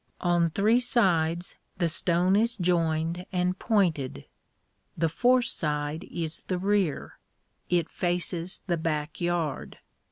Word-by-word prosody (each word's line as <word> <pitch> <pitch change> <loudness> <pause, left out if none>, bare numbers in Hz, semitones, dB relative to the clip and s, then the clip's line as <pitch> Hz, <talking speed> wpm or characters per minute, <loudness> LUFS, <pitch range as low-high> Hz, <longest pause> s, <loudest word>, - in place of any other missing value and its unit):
On 175 -1 +2
three 210 +8 +3
sides 175 -9 +1 0.2
the 175 -2 +1
stone 175 +3 +2
is 230 +2 +2
joined 170 -1 0
and 180 0 0
pointed. 165 - 0 0.7
The 165 0 +1
fourth 245 +8 +3
side 150 0 -2
is 165 -1 -4
the 185 - -1
rear. 195 -4 -1 0.5
It 175 -2 +2
faces 175 0 -2
the 175 -3 0
back 155 0 -3
yard. 170 -4 -2
175 Hz, 120 wpm, -27 LUFS, 160-185 Hz, 0.7 s, three